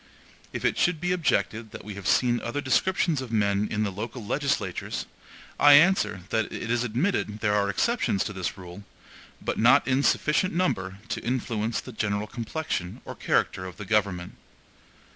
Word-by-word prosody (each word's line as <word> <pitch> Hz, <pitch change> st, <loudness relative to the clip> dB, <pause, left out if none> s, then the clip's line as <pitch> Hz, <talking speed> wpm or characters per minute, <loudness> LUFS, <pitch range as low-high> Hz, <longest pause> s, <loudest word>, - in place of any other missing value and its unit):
If -, -, -4 dB
it -, -, +1 dB
should 175 Hz, -3 st, +2 dB
be 180 Hz, +2 st, -1 dB
objected 115 Hz, -10 st, 0 dB
that -, -, -9 dB
we 105 Hz, -, -6 dB
have 95 Hz, -1 st, -6 dB
seen 120 Hz, -1 st, +3 dB
other 120 Hz, +5 st, -3 dB
descriptions 155 Hz, +2 st, +1 dB
of 130 Hz, -3 st, -7 dB
men 100 Hz, -1 st, +1 dB
in 110 Hz, 0 st, 0 dB
the 100 Hz, -, -1 dB
local 110 Hz, +4 st, -6 dB
legislatures, 140 Hz, +5 st, -2 dB, 0.5 s
I 145 Hz, 0 st, +8 dB
answer 160 Hz, -, +4 dB
that 110 Hz, -1 st, 0 dB
it 115 Hz, -, -4 dB
is 120 Hz, 0 st, +1 dB
admitted 120 Hz, -, -1 dB
there 105 Hz, -2 st, +2 dB
are 100 Hz, -1 st, +2 dB
exceptions 105 Hz, -, +1 dB
to 105 Hz, -, -5 dB
the 95 Hz, -2 st, -2 dB
rule, 90 Hz, +1 st, -10 dB, 0.6 s
but -, -, -2 dB
not 125 Hz, +5 st, +5 dB
in 130 Hz, +1 st, +2 dB
sufficient 155 Hz, +5 st, +2 dB
number 100 Hz, -, 0 dB
to -, -, -3 dB
influence 115 Hz, -2 st, -1 dB
the 130 Hz, -, -10 dB
general 105 Hz, -2 st, -1 dB
complexion 115 Hz, -, -4 dB
or -, -, -6 dB
character 95 Hz, -, 0 dB
of 90 Hz, -, -10 dB
the 105 Hz, -, -7 dB
government. 95 Hz, -4 st, 0 dB
115 Hz, 175 wpm, -26 LUFS, 100-140 Hz, 0.6 s, I